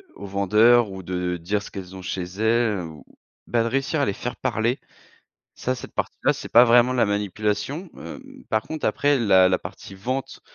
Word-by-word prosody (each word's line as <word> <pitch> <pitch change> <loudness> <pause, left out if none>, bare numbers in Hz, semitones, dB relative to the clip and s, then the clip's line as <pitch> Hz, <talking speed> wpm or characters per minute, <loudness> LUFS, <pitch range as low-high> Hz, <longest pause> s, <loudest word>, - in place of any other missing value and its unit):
aux 100 - -9
vendeurs 105 +3 +4
ou 95 -1 -8
de 90 0 -2
dire 100 +5 -2
ce - - -9
qu'elles 95 -2 -8
ont 95 - -8
chez 90 0 -3
elles, 110 +3 +1
ou 80 -3 -10 0.4
ben, 115 -1 +1
de 115 - -1
réussir 135 +4 0
à 140 - +3
les 100 - -1
faire 120 +5 -5
parler, 120 +4 -1 0.8
ça 130 - -2
cette 125 - -10
partie - - -3
là, - - +5
c'est - - -8
pas 120 +2 +8
vraiment 120 +1 +5
de 130 - -2
la 115 - +4
manipulation. 105 - -2
Hem, 85 - -10
par 110 0 +1
contre 155 +5 -6
après 145 0 +2
la 95 -5 +5
la 90 -1 +2
partie 95 - -10
vente, 130 +8 -4
105 Hz, 205 wpm, -24 LUFS, 95-120 Hz, 0.8 s, pas